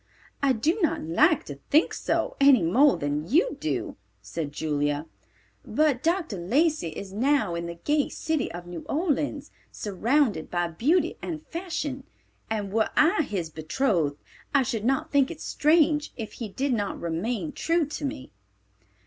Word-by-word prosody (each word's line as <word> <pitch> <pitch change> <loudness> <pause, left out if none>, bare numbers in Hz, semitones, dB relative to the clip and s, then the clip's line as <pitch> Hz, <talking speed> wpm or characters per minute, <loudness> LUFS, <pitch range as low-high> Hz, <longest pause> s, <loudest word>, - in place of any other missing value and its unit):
"I 275 -2 +4
do 310 - 0
not 320 - +1
like 300 - +3
to 140 -1 -9
think 310 +4 +4
so, - - -1
any 275 -8 +7
more 260 - +4
than 145 +2 -2
you 350 - +3
do," - - -3 0.2
said 155 -4 -5
Julia. 145 0 -1 0.6
"But 295 -5 +1
Dr. 330 - 0
Lacey 290 - +1
is 190 +4 -8
now 245 -4 +2
in 170 0 -3
the 170 - -6
gay 290 - 0
city 315 -5 -2
of 175 +1 -8
New 175 -1 -6
Orleans, 295 -2 -1 0.2
surrounded 215 - 0
by 175 -1 0
beauty 305 - +1
and 315 -3 -5
fashion, 320 -6 -4 0.4
and 205 -3 -3
were 220 0 +2
I 325 +4 +5
his 185 - -3
betrothed, 160 - 0 0.4
I 275 - +5
should 225 -4 -3
not 270 +5 0
think 280 -2 +3
it 335 - -7
strange 305 -1 +2
if 225 -3 -5
he 225 - -3
did 270 +6 -1
not 205 -3 -2
remain 215 - -2
true 330 +2 +1
to 295 +1 -6
me." 280 -1 -5
260 Hz, 155 wpm, -26 LUFS, -, 0.6 s, any